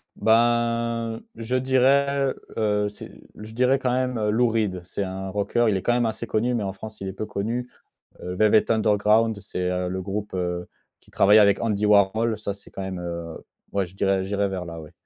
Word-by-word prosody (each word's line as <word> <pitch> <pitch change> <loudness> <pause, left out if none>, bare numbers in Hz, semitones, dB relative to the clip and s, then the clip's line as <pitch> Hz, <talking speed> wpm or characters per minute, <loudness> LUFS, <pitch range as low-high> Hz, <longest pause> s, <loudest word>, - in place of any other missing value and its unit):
Ben, 115 0 +1
je 115 +2 -3
dirais, 135 +1 +2 0.2
heu, 105 -2 +1
c'est 105 - -11 0.3
je 110 +1 -10
dirais 125 +3 +2
quand 130 -2 0
même 130 -1 0
heu, 105 -1 0
Lou 120 +2 +3
Reed. 105 -5 -1
C'est 90 +3 -4
un 95 0 -5
rockeur, 105 +4 +1
il 100 - +1
est - - -3
quand 120 - +1
même 120 0 +2
assez 110 +1 -3
connu, 120 +4 0
mais 115 - -1
en 95 -1 -3
France 110 +2 -10
il 95 - -5
est 95 - -4
peu 110 - -5
connu. 115 +5 -3 0.5
Heu, 90 0 -4
Velvet 110 +2 +3
Underground 110 0 +3
c'est 90 -2 -3
heu, 90 0 -1
le 95 +1 -3
groupe 100 +2 -4
heu, 90 -1 -3 0.3
qui - - -24
travaille 105 +2 +5
avec 100 -2 +5
Andy 105 -2 0
Warhol. 105 +2 +3
Ça, 100 -2 -4
c'est 100 0 -17
quand 95 - -6
même 95 -1 -4
heu 85 -1 -6 0.4
ouais, 100 -1 +1
je 90 - -17
dirais 95 -1 +1
j'irais 100 +1 0
vers 95 -2 -4
là, 85 -1 -8
ouais. 75 -1 -12
105 Hz, 210 wpm, -24 LUFS, 95-115 Hz, 0.5 s, travaille